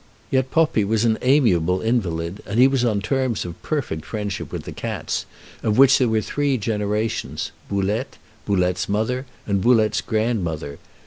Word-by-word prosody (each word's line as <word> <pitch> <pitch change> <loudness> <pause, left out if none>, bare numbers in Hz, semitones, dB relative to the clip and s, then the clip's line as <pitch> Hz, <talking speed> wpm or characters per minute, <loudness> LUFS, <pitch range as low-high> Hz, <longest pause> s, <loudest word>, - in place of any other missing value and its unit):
Yet 130 -1 +1
Poppi 155 -8 +2
was 110 +3 +1
an 110 -1 +2
amiable 95 - +3
invalid, 95 -6 -1
and 105 +4 -1
he 130 - +8
was 135 -2 +1
on 110 -4 +1
terms 130 +1 -1
of 85 0 -8
perfect 120 - -2
friendship 105 -1 -4
with - - -5
the - - -7
cats, - - -3 0.3
of 105 -1 0
which 135 0 +7
there 125 -3 +3
were 110 -1 +2
three 145 +3 0
generations 105 +1 -2 0.2
Boulette, 100 +2 -1 0.3
Boulette's 90 -2 +1
mother, 125 +6 -1 0.2
and 100 -2 0
Boulette's 110 -2 +3
grandmother. 90 -10 -2
110 Hz, 155 wpm, -22 LUFS, 100-125 Hz, 0.3 s, he